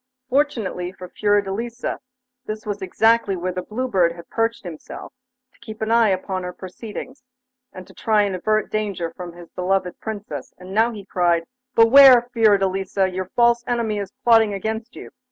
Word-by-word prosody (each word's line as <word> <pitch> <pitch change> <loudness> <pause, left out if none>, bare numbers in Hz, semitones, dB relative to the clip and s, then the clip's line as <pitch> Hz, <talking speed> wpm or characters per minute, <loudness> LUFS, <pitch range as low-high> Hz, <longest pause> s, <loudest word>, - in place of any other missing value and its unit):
Fortunately 230 -10 0
for 185 -1 -11
Fiordelisa 205 +4 -1 0.5
this 215 0 -5
was 205 -1 -4
exactly 220 +1 +2
where 180 +1 -2
the 180 0 -4
Blue 250 +7 -4
Bird 180 -7 +2
had 170 0 -12
perched 225 0 -1
himself, 170 - -9 0.4
to - - -28
keep 220 -2 -10
an 220 0 -2
eye 230 -2 +5
upon 185 0 -2
her 180 0 -5
proceedings, 220 +8 -9 0.5
and 185 -1 -11
try 210 -2 +2
to 195 - -3
avert 215 +4 0
danger 200 -6 -2
from 175 -2 -8
his 175 -1 -13
beloved 185 0 -1
Princess, 215 -2 -7
and 185 +1 -10
now 225 +3 +3
he 210 -4 -9
cried: 175 -3 +1 0.3
'Beware, 245 +1 +8
Fiordelisa! 195 -3 +2
Your 185 0 -4
false 235 0 +4
enemy 230 -4 -1
is 200 -1 -5
plotting 225 -4 +4
against 220 +4 -4
you. - - -10
205 Hz, 165 wpm, -22 LUFS, 185-230 Hz, 0.5 s, Beware